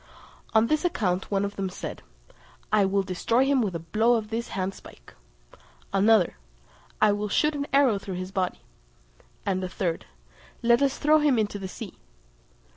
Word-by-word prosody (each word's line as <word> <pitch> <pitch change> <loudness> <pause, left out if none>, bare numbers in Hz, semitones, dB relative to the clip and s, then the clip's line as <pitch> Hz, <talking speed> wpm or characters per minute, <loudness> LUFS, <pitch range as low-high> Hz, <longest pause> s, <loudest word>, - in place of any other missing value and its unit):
On 220 +1 +6
this 310 +6 +1
account 190 - 0
one 200 -1 +1
of 200 - -6
them 195 -1 -2
said, 185 - -7 0.7
"I 210 -2 +5
will 195 +1 +1
destroy 225 +7 +1
him 275 -1 +3
with 200 -6 -1
a - - -2
blow 220 +8 +3
of 220 -1 -3
this 235 +1 -3
handspike;" 185 - -6 0.8
another, 200 - +4 0.6
"I 215 -1 +5
will 205 +1 -2
shoot 300 +9 +2
an 285 -1 -3
arrow 265 -7 +4
through 195 -1 -6
his 185 +1 -5
body;" 185 -2 -2 0.8
and 190 -1 0
a 185 - -3
third, 180 -2 -3 0.6
"Let 235 +1 +4
us 275 -1 +1
throw 305 +1 +4
him 295 -4 +3
into 205 -2 -1
the 190 - -5
sea." 195 +1 -9
205 Hz, 170 wpm, -26 LUFS, 190-240 Hz, 0.8 s, On